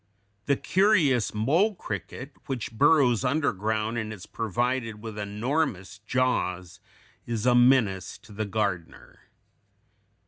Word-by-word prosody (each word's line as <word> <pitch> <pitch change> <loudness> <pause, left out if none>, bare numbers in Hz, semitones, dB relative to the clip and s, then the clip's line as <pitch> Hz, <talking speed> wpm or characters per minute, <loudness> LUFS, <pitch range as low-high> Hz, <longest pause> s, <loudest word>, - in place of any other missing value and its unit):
The 140 - +3
curious 175 - +2
mole 160 - +1
cricket, 115 - -6 0.2
which 125 -4 -4
burrows 125 0 +3
underground 110 -5 0
and 110 -1 -4
is 100 -4 -9
provided 115 +1 -2
with 110 -1 -8
enormous 105 - -2
jaws, 95 -9 -1 0.5
is 115 -2 -3
a 125 - +5
menace 120 -7 +3
to - - -16
the 110 +1 -3
gardener. 100 -5 -4
115 Hz, 110 wpm, -26 LUFS, 105-130 Hz, 0.5 s, a